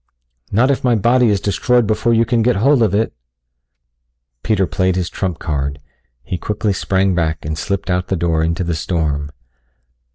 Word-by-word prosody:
"Not 120 +7 +3
if 135 - -2
my 125 -2 +3
body 120 +3 +3
is 100 -2 +2
destroyed 120 +4 +1
before 110 +2 +1
you 115 0 +3
can 115 0 +1
get 125 +2 +2
hold 130 +6 +3
of 105 -3 +2
it." 110 +2 0 1.3
Peter 105 -4 +1
played 95 +1 0
his 90 -2 -2
trump 90 -4 -3
card. 70 -3 -3 0.5
He 90 - -4
quickly 105 +1 -1
sprang 95 0 +1
back 80 -4 -1
and 80 0 -2
slipped 100 +4 -3
out 90 0 -1
the 95 - -1
door 80 -2 0
into 85 +3 -1
the 85 -1 -2
storm. 75 -3 -2
95 Hz, 175 wpm, -18 LUFS, 85-115 Hz, 1.3 s, Not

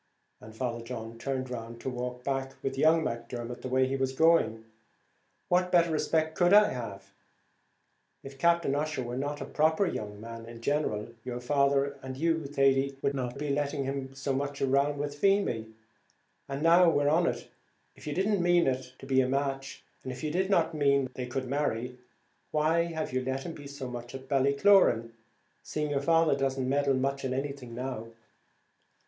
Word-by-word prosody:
and 110 0 -13
Father 120 -1 -3
John 115 -1 -7
turned 130 0 -3
round 115 -1 -6
to - - -3
walk 125 0 -5
back 135 0 -2
with 135 0 -2
young 160 +3 +4
Macdermot 120 0 -5
the - - -4
way 130 +1 +3
he 135 - -1
was 135 -1 -1
going, 130 -8 +3 0.8
"what 180 0 +2
better 170 -2 +4
respect 160 0 +1
could 175 +2 +3
I 210 0 +7
have? 100 -6 -7 1.1
If 135 0 -10
Captain 170 -3 +3
Ussher 150 -2 -1
were 120 0 -5
not 145 +3 -3
a - - -3
proper 160 +5 +2
young 105 - -4
man 115 +1 -8
in 115 0 -10
general, 115 -5 -1
your 125 -1 -4
father 140 +1 +1
and 130 0 -7
you, 160 0 0
Thady, 135 -1 +2
wouldn't 130 -2 -1
be 145 0 -2
letting 140 0 -1
him 135 0 -3
be 135 - -18
so 135 0 -2
much 140 +1 -2
with 145 +2 0
Feemy; 195 - +2 0.8
and, 140 +2 -3
now 170 +1 +6
we're 145 -3 +2
on 165 +4 +3
it, - - -3 0.5
if - - -13
you 150 - -2
did 190 - +1
not 210 -2 +2
mean 175 -1 +4
it 130 -1 -2
to - - -11
be 130 -1 +3
a 130 - 0
match, 135 0 -2 0.2
and 130 - -5
if 130 0 -8
you 155 - -1
did 190 +4 0
not 170 -4 +2
mean 140 -3 +2
they 125 -1 -5
should 130 +1 -2
marry, 125 -3 -2 0.5
why 160 +2 +2
have 160 -5 -4
you 130 0 0
let 130 +1 -3
him 170 - -5
be 145 -2 -10
so 140 -2 -6
much 120 +1 -7
at 135 0 -9
Ballycloran, 140 - +4 0.5
seeing 150 -1 -3
your 140 -1 0
father 165 0 +3
doesn't 135 -1 -1
meddle 140 0 +2
much 135 +1 -1
in 130 -1 -1
anything 135 -3 -5
now?" 125 -3 -4
135 Hz, 185 wpm, -29 LUFS, 125-150 Hz, 1.1 s, I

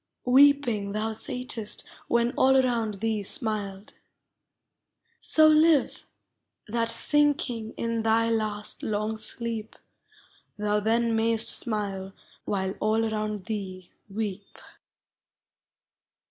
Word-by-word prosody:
Weeping 250 -6 +4
thou 215 +1 -2
sat'st 245 -2 -2 0.2
when 235 0 +2
all 265 0 +3
around 235 -5 +1
thee 220 -2 0
smiled: 205 -4 -4 1.3
So 315 0 +5
live, 310 -1 +3 0.6
that, 230 +1 -1
sinking 245 -3 +1
in 230 -1 -2
thy 225 +1 +2
last 215 -2 -2
long 215 +1 -2
sleep, 220 0 -4 0.8
Thou 210 0 0
then 230 +2 +1
mayst 225 0 +2
smile 200 -4 -3 0.3
while 190 -2 -1
all 220 +1 +1
around 210 -2 -3
thee 190 -5 -6 0.2
weep. 205 -1 -5
220 Hz, 95 wpm, -26 LUFS, 210-235 Hz, 1.3 s, So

